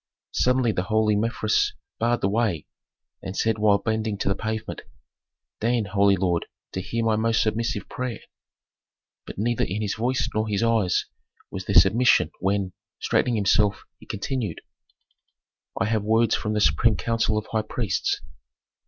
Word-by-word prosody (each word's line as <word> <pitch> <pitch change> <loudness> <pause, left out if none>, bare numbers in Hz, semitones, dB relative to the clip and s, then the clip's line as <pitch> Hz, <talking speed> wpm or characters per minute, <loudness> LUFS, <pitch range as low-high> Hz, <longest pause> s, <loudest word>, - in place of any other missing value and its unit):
Suddenly 125 -2 +2
the 90 - -1
holy 110 -1 +3
Mefres 110 0 +1 0.3
barred 120 +1 +1
the - - +2
way, 100 -6 0 0.6
and 95 +1 -6
said 110 -1 +1
while 105 -1 +4
bending 110 0 -2
to 100 - -1
the - - +3
pavement, 110 +1 -4 0.8
"Deign, 115 0 +1
holy 100 0 +3
lord, 90 -3 0 0.2
to 95 - -3
hear 115 +4 -2
my 110 -1 +3
most 110 +1 +2
submissive 115 +1 -2
prayer." 125 -3 -5 1.1
But - - -8
neither 115 +3 0
in 105 +4 -2
his 105 - -1
voice 125 +3 0
nor 110 +1 0
his 105 +1 0
eyes 115 -6 +2 0.5
was - - -6
there - - -2
submission 115 +6 +5
when, 95 -1 0 0.3
straightening 120 - +1
himself, 105 0 +2 0.2
he - - -16
continued, 110 - -3 1.2
"I 115 - +2
have 110 0 +1
words 110 +2 +2
from 105 - -1
the 105 - 0
supreme 115 +1 +3
council 115 -2 0
of 105 - -2
high 110 - +1
priests." 110 -3 -2
110 Hz, 155 wpm, -24 LUFS, 100-115 Hz, 1.2 s, submission